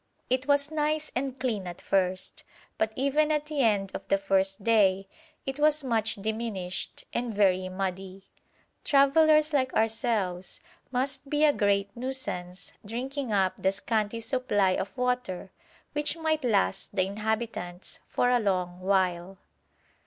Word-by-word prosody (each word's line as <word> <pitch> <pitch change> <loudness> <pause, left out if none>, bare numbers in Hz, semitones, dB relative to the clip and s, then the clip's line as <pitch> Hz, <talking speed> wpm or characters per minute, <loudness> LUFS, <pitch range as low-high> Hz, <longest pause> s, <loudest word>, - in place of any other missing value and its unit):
It 260 +1 +1
was 285 +1 +3
nice 305 0 -1
and 265 +1 -2
clean 215 -7 -2
at 175 -1 -7
first, 185 -1 -1 0.4
but 220 0 +1
even 290 +3 +2
at 300 -1 0
the 300 -2 -1
end 205 -5 +2
of - - -7
the 195 - +3
first 195 0 0
day 195 -4 +3 0.4
it 270 +2 -4
was 305 0 +3
much 225 -3 +1
diminished 210 -3 -3
and 235 -2 -2
very 185 -2 +3
muddy. 190 0 -4 0.6
Travellers 305 +2 +4
like 260 -2 +2
ourselves 215 -5 0 0.3
must 270 +2 -1
be 300 +1 +3
a 295 - +5
great 200 -1 +1
nuisance 235 -8 -4
drinking 255 +4 -4
up 190 -2 +1
the 190 - +3
scanty 215 +2 -1
supply 220 -6 +1
of 190 +6 -3
water 250 -7 -1 0.4
which 295 +2 0
might 315 -2 0
last 200 -4 +1
the 185 -2 +3
inhabitants 210 -3 -3
for 245 - +1
a 245 - +4
long 180 -4 -1
while. 185 -1 0
220 Hz, 140 wpm, -28 LUFS, 195-270 Hz, 0.6 s, a